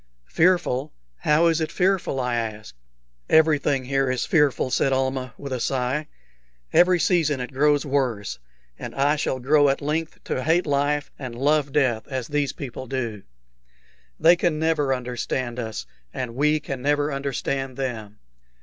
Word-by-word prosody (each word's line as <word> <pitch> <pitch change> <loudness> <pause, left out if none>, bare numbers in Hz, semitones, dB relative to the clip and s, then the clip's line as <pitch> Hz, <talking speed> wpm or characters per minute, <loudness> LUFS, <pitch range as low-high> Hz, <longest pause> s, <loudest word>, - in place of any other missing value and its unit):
"Fearful? 160 -6 +2 0.3
How 150 - +3
is 165 -1 +2
it 160 - -2
fearful?" 185 -7 +1
I 125 -1 -1
asked. 110 - -4 0.6
"Everything 150 -4 +3
here 135 0 +1
is 130 -1 -1
fearful," 145 -5 +2
said 135 +2 +2
Almah, 130 -1 -1
with 140 -2 -6
a 125 - -2
sigh. 130 +4 -1 0.7
"Every 180 0 +5
season 160 -6 +2
it 125 +2 -6
grows 145 +2 +2
worse, 125 - -1 0.4
and - - -7
I 145 +2 +2
shall 135 -3 -2
grow 145 +3 +4
at 135 - 0
length 155 +3 -3
to 130 - -3
hate 165 +3 +2
life 145 0 0
and 130 -4 -6
love 145 +2 +1
death 130 -6 +1
as 130 -2 -4
these 145 -2 0
people 130 -1 -7
do. 115 -5 -3 1.0
They 165 +3 +6
can 170 -2 0
never 155 -3 +1
understand 125 -1 -3
us, 110 -2 -5 0.3
and 125 -3 -4
we 150 +4 +2
can 135 -3 -6
never 145 +1 +1
understand 135 -1 -3
them. 110 -6 -4
140 Hz, 155 wpm, -24 LUFS, 130-150 Hz, 1.0 s, They